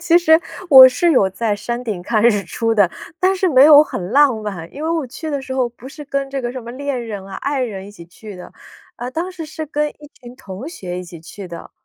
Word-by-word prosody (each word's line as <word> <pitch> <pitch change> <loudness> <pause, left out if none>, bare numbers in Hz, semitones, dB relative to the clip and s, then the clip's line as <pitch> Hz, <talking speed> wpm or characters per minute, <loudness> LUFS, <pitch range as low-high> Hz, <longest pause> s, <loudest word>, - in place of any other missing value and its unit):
其 340 0 +3
实 320 -1 +4 0.3
我 260 -2 +11
是 330 +7 +1
有 195 -7 +3
在 210 +2 -2
山 235 +4 -5
顶 205 -7 -4
看 215 +3 0
日 210 -4 +3
出 225 +5 -2
的， 200 -5 +3 0.3
但 375 +1 +3
是 375 0 0
没 265 -2 +6
有 295 -1 +9
很 185 -9 -6
浪 280 -1 +4
漫。 175 -5 -7
因 290 - -7
为 320 - -2
我 325 -5 -1
去 310 +6 -8
的 285 -2 -2
时 260 0 -6
候 255 -2 0
不 240 +1 -15
是 300 +1 -10
跟 275 -1 -2
这 275 -1 -3
个 240 - -3
什 255 0 -7
么 235 +1 -9
恋 275 -1 -4
人 205 -3 -6
啊、 195 - -9
爱 280 -1 -2
人 195 -5 -5
一 205 - -11
起 170 - -13
去 205 +4 -12
的， 180 -1 -11 0.5
呃， 245 +1 -6
当 335 +6 -4
时 345 -3 -8
是 315 0 -7
跟 300 0 -1
一 295 0 -16
群 240 0 -11
同 205 -1 -9
学 185 - -7
一 180 - -7
起 170 -2 -12
去 190 +4 -10
的。 170 -1 -10
250 Hz, 280 characters per minute, -18 LUFS, 205-295 Hz, 0.5 s, 我